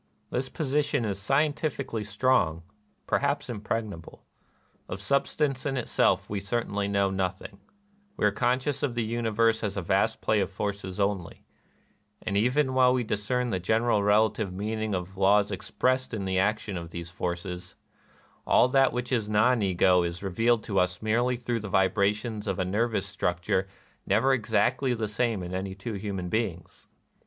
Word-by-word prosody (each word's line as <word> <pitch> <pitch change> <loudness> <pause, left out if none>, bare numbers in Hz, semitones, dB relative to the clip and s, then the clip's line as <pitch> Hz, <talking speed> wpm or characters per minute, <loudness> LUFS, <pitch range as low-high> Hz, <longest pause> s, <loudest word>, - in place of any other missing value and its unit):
This 130 +1 -1
position 145 -4 0
is 100 -2 -3
scientifically 140 -3 0
strong, 105 -7 +1 0.2
— - - -42
perhaps 140 -2 0
impregnable. 105 -5 -5 0.6
Of 95 - -4
substance 140 +3 0
in 135 -2 -1
itself 100 -5 +1
we 105 - -3
certainly 100 -1 -2
know 100 -1 +1
nothing: 95 +1 -3 0.6
we - - +1
are 105 - +4
conscious 125 +6 0
of 135 -5 -1
the 120 - 0
universe 115 0 +1
as 105 -1 -2
a - - 0
vast 95 +1 +1
play 110 - +1
of 95 -2 0
forces 100 -1 -4
only; 100 -3 -2 0.8
and, 100 - -2
even 130 +6 +2
while 130 -1 +5
we 125 - 0
discern 120 +3 -1
the 95 - 0
general 110 +3 +2
relative 105 0 +2
meaning 110 +2 -2
of 90 +1 -5
laws 100 +1 +4
expressed 130 +6 -1
in 100 -3 -3
the 95 0 +1
action 105 -1 0
of 85 -1 -6
those 85 0 -7
forces, 90 +2 -4 0.7
all - - +5
that 135 0 +4
which 125 +1 -3
is 115 -5 0
Non 110 +3 +3
Ego 90 -1 +3
is 85 +1 -3
revealed 115 +4 +1
to 100 -3 0
us 90 +2 0
merely 120 +3 +1
through 120 -1 -2
the 105 - -6
vibrations 105 +3 +1
of 95 -2 -1
a 95 - 0
nervous 105 +1 0
structure 95 -1 -1 0.4
never 115 +7 +3
exactly 125 +2 +1
the 110 -2 -2
same 110 -2 -1
in 90 +1 -6
any 95 +1 -3
two 105 +4 -6
human 100 -3 -4
beings. 90 -4 -3
105 Hz, 165 wpm, -27 LUFS, 95-120 Hz, 0.8 s, while